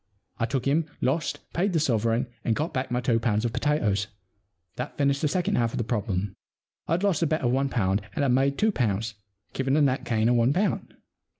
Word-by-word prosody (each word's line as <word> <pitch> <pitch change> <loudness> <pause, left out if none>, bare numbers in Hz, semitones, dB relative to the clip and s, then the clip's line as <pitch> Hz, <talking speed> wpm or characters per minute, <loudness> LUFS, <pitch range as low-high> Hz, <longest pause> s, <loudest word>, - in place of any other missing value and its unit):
I 115 - +1
took 130 -2 -2
him, 150 +3 +2
lost, 150 +4 -1
paid 185 +3 +1
the 165 - +3
sovereign, 115 -3 +1 0.2
and 115 - +1
got 160 +5 -2
back 130 -1 -2
my 125 0 0
two 120 -2 +2
pounds 110 -1 0
of 115 - -1
potatoes. 105 -10 +1 0.7
That 125 +3 -5
finished 140 -1 +2
the 150 - +2
second 185 +5 0
half 115 -1 +1
of - - -3
the 120 - 0
problem. 105 -4 -2 0.5
I'd 170 +4 0
lost 190 -6 +2
a 165 - +3
bet 155 +1 0
of 120 -2 +1
one 135 +2 +1
pound, 100 -5 +1
and 145 - 0
had 135 - +3
made 135 +2 +2
two 220 +1 +3
pounds, 115 - -1 0.4
giving 135 +2 +1
a - - +4
net 135 -2 +1
gain 110 -1 +1
of 120 - +4
one 120 +3 +3
pound. 195 +5 -1
130 Hz, 220 wpm, -26 LUFS, 115-150 Hz, 0.7 s, a